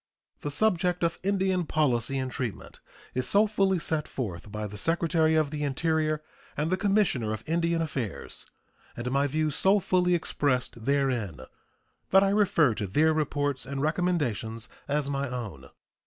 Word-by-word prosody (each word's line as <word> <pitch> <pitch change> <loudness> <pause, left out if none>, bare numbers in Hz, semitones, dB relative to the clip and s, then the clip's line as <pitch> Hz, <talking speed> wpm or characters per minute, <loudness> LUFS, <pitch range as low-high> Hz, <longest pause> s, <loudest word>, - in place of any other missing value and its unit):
The 145 - -4
subject 180 +1 +1
of 165 0 0
Indian 190 -2 +1
policy 135 -3 +1
and 130 -1 -2
treatment 120 -6 -5 0.3
is 130 0 +3
so 205 +2 +5
fully 195 -3 +1
set 160 -2 0
forth 105 -5 -5
by 105 0 -4
the 105 0 -7
Secretary 165 - +2
of 155 -2 +2
the 150 -1 -4
Interior 155 +1 0 0.3
and 155 +4 0
the - - +4
Commissioner 195 - +1
of 110 - -6
Indian 170 0 +1
Affairs, 130 - -5 0.5
and 120 +1 -3
my 140 +1 +2
views 155 +1 0
so 195 +4 +4
fully 180 -1 +2
expressed 130 -8 -1
therein, 130 - 0 0.7
that 195 +1 +6
I 195 - +3
refer 195 - +3
to 105 -1 -3
their 155 +11 +3
reports 145 -3 -1
and 140 0 -4
recommendations 140 - -1 0.2
as 145 0 0
my 140 -1 -2
own. 110 - -6
150 Hz, 155 wpm, -28 LUFS, 125-175 Hz, 0.7 s, that